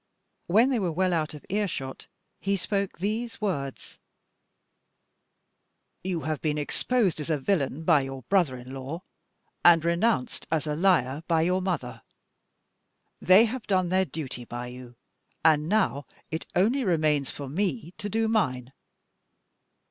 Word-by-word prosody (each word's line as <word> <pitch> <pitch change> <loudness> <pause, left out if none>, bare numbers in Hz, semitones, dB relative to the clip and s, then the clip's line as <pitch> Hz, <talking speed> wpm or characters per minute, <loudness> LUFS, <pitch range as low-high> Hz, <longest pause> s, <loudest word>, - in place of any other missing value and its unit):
When 225 +9 +4
they 250 - +1
were 180 -4 0
well 185 +2 +1
out 155 -2 -1
of 150 - -12
ear 205 +1 0
shot, 135 -6 -6 0.3
he 200 0 0
spoke 200 +1 -2
these 220 +5 -3
words: 145 -10 -4 2.0
"You 180 -3 -2
have 155 -1 -3
been 150 -1 0
exposed 190 +5 0
as 150 - -5
a 155 - +2
villain 145 -1 -1
by 160 -3 +5
your 135 -1 -6
brother 155 - +2
in 125 +1 -10
law, 135 +7 -6 0.6
and 165 -2 +7
renounced 170 - 0
as 160 -1 0
a 150 -1 -1
liar 155 -6 +2
by 165 -2 +3
your 180 +2 +1
mother. 130 -11 -3 1.2
They 185 +6 +7
have 240 +1 -5
done 185 -3 +2
their 190 +1 +3
duty 135 -5 -6
by 120 +1 -6
you, 125 -1 -11 0.5
and 155 -1 +4
now 145 -10 +1 0.2
it 160 +1 -4
only 235 +9 +3
remains 155 - +1
for 140 - -6
me 165 - -2
to 205 - -4
do 225 +2 +1
mine. 130 - 0
165 Hz, 150 wpm, -27 LUFS, 140-195 Hz, 2.0 s, and